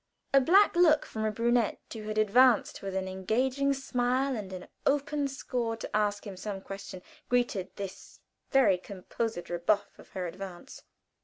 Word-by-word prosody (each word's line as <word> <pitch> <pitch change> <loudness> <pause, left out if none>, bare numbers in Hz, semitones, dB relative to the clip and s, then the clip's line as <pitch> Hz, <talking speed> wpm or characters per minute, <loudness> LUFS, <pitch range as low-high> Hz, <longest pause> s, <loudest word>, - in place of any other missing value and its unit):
A 275 - +7
black 380 +10 +5
look 325 -4 +5
from 220 0 -4
a 215 - +1
pretty 230 +3 0
brunette, 240 -3 +2
who 225 - -6
had 215 0 -3
advanced 230 +3 +4
with 195 -1 -5
an 190 0 -1
engaging 250 +9 0
smile 265 0 0
and 205 -4 -6
an 185 -1 -7 0.2
open 285 0 +1
score 245 -4 -3
to - - -6
ask 205 0 0
him 200 -2 -7
some 195 +1 -5
question, 195 -1 -8 0.3
greeted 240 -7 +1
this 195 -1 -8 0.3
very 255 -9 +4
composed 200 +1 -4
rebuff 200 +4 0
of - - -15
her 185 -2 -3
advance. 180 0 -8
220 Hz, 165 wpm, -29 LUFS, 195-260 Hz, 0.3 s, A